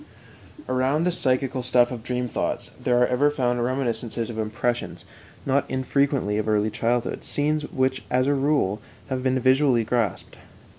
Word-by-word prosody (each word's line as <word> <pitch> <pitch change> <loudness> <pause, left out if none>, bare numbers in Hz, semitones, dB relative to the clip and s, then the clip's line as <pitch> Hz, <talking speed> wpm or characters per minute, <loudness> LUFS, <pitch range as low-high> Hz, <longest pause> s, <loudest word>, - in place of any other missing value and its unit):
Around 130 +5 +1
the 180 - +2
psychical 130 -4 0
stuff 125 0 +3
of 120 -3 -5
dream 125 +1 -2
thoughts - - -3
there 125 -1 +2
are 125 - +5
ever 130 +4 +2
found 125 -4 0
reminiscences 120 -2 -2
of 110 - -6
impressions, 115 +3 -2 0.4
not 140 +1 +2
infrequently 130 -4 0
of 110 - -2
early 105 0 +2
childhood 120 +2 -1
scenes 150 +1 -1
which, 130 -1 0
as 130 +1 +2
a 145 - +2
rule, 135 -8 +1 0.3
have 130 -1 -2
been 130 0 +1
visually 130 -1 +3
grasped. 115 -3 -2
125 Hz, 155 wpm, -24 LUFS, 120-135 Hz, 0.4 s, are